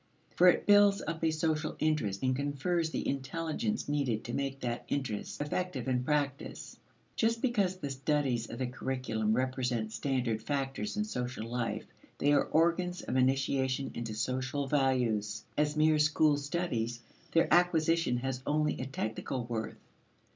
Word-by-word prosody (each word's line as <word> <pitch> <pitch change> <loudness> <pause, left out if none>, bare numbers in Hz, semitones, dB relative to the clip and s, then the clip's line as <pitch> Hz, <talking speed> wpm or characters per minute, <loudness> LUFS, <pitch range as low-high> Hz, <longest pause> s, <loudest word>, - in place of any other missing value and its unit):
For 180 - +6
it 180 - +5
builds 205 -1 +6
up 165 0 -4
a 160 - +4
social 155 0 -1
interest 140 -11 0
and 130 0 +2
confers 145 +5 0
the - - -3
intelligence 165 - -2
needed 140 -7 0
to 120 - -6
make 135 -1 -2
that 120 -1 -2
interest 130 -7 -3
effective 145 -3 -2
in 125 -1 +1
practice. 140 -1 -2 0.4
Just 230 0 +1
because 205 -7 +1
the 140 -6 -4
studies 135 -3 0
of 115 - -6
the 130 - -1
curriculum 125 -4 -1
represent 125 -3 -1
standard 120 -2 -1
factors 140 - -2
in 210 - +2
social 125 - -4
life, 120 0 -2 0.3
they 145 +1 +3
are 145 - +4
organs 170 +2 +1
of 125 - -3
initiation 130 0 +1
into 115 -2 -4
social 130 +4 -1
values. 125 -7 +1
As 150 0 +1
mere 155 0 +4
school 150 0 +4
studies, 140 -6 -2 0.3
their 165 - +4
acquisition 165 -5 +3
has 130 0 -3
only 150 -1 +1
a 130 - -3
technical 125 0 -3
worth. 115 -2 -4
135 Hz, 150 wpm, -31 LUFS, 125-155 Hz, 0.4 s, For